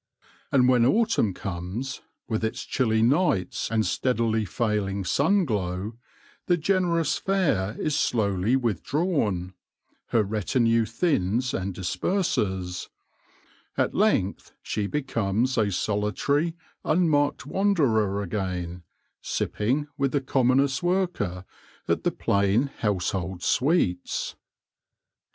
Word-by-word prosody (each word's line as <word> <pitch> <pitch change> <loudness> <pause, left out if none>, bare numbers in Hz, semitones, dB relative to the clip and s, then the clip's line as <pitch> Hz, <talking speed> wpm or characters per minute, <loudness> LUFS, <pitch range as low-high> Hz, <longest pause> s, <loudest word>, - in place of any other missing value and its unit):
And 125 -2 +4
when 125 -2 +4
autumn 210 - +3
comes, 95 +9 -5 0.3
with 110 -2 -2
its 110 - -2
chilly 110 -4 +1
nights 135 - +1
and 110 -1 +1
steadily 115 -4 0
failing 100 -1 -1
sun 180 - +2
glow, 100 - -2 0.5
the 175 - +3
generous 170 -2 +1
fare 145 - 0
is 155 -2 0
slowly 105 -5 +1
withdrawn; 120 - 0 0.5
her 115 -2 +2
retinue 115 +3 +1
thins 120 - 0
and 95 0 -3
disperses; 95 - -1 0.9
at - - +1
length 185 - +1
she 105 -1 -2
becomes 120 -2 0
a 105 -3 +2
solitary, 110 - 0 0.3
unmarked 155 -5 +2
wanderer 130 - +1
again, 90 -2 -3 0.4
sipping, 130 +8 -1
with 140 -1 +1
the 145 - +3
commonest 135 0 +2
worker, 175 - -1 0.4
at - - 0
the - - +2
plain 100 +7 +1
household 95 -3 -1
sweets. 125 - +1
115 Hz, 100 wpm, -26 LUFS, 95-145 Hz, 0.9 s, And